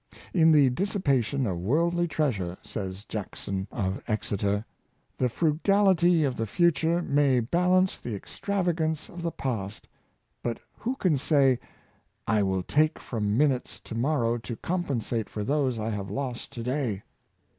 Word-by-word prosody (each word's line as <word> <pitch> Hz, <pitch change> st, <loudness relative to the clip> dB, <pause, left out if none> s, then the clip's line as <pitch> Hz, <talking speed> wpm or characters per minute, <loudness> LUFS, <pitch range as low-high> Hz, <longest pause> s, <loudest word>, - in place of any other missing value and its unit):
"In 165 Hz, -3 st, +5 dB
the 145 Hz, -4 st, +6 dB
dissi 200 Hz, +9 st, -1 dB
pation 135 Hz, -, +1 dB
of 90 Hz, -4 st, -2 dB
worldly 170 Hz, -, +2 dB
treasure," 105 Hz, -, -1 dB
says 95 Hz, 0 st, -6 dB
Jackson 100 Hz, -2 st, -4 dB
of 95 Hz, -3 st, -2 dB
Exeter,. 105 Hz, -1 st, -1 dB, 0.3 s
" -, -, -43 dB
the 125 Hz, -, +2 dB
frugality 175 Hz, -, +3 dB
of 135 Hz, -3 st, 0 dB
the 115 Hz, -, -1 dB
future 170 Hz, -, +2 dB
may 140 Hz, -4 st, +3 dB
balance 180 Hz, +9 st, +2 dB
the 105 Hz, -5 st, -4 dB
extrava 190 Hz, -, -1 dB
gance 160 Hz, -2 st, -2 dB
of 175 Hz, -, -8 dB
the 170 Hz, -, -1 dB
past; 110 Hz, -10 st, -4 dB, 0.5 s
but 120 Hz, -1 st, -2 dB
who 250 Hz, +4 st, -3 dB
can 175 Hz, -, +1 dB
say, 135 Hz, -4 st, +3 dB, 0.3 s
' -, -, -41 dB
I -, -, +3 dB
will 95 Hz, -2 st, 0 dB
take 155 Hz, -, +2 dB
from 105 Hz, -2 st, -2 dB
minutes 135 Hz, -3 st, +1 dB
to -, -, -9 dB
morrow 120 Hz, -1 st, +1 dB
to 115 Hz, +1 st, -6 dB
compensate 125 Hz, -, -2 dB
for 105 Hz, -, -4 dB
those 135 Hz, 0 st, +1 dB
I 110 Hz, +1 st, -2 dB
have 100 Hz, -2 st, -4 dB
lost 125 Hz, +3 st, -4 dB
to 115 Hz, -, -5 dB
day. 125 Hz, -6 st, -1 dB
130 Hz, 155 wpm, -27 LUFS, 110-165 Hz, 0.5 s, the